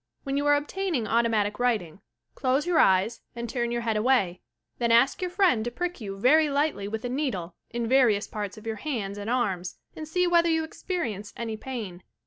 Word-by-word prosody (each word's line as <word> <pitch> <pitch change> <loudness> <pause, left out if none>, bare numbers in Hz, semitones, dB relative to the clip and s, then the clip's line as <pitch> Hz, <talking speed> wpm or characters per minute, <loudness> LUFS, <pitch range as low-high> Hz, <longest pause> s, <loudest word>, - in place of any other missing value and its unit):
When 275 -1 -2
you 285 +1 0
are 290 - +6
obtaining 300 - -1
automatic 220 -2 +1
writing, 210 -9 0 0.3
close 265 +1 0
your 350 -2 +2
eyes 190 +5 +3
and 235 0 -4
turn 235 0 -1
your 235 0 -1
head 225 -2 -1
away, 210 -6 +2 0.4
then 235 -1 +1
ask 235 +8 +4
your 365 - -1
friend 355 - +3
to 240 - -2
prick 350 +4 -4
you 195 -2 -5
verj 295 +8 +4
lightly 280 -8 0
with 220 +3 -4
a - - 0
needle 240 - -2 0.2
in 235 -1 -3
various 235 -5 +4
parts 210 0 -5
of 215 - -12
your 225 -1 -3
hands 205 -7 -4
and 205 +2 -5
arms 195 -8 -1 0.2
and 310 - -7
see 360 +3 +1
whether 340 -1 +4
you 320 -1 +2
experience 315 - -4
any 225 -2 -3
pain. 215 -7 -6
235 Hz, 200 wpm, -27 LUFS, 210-290 Hz, 0.4 s, are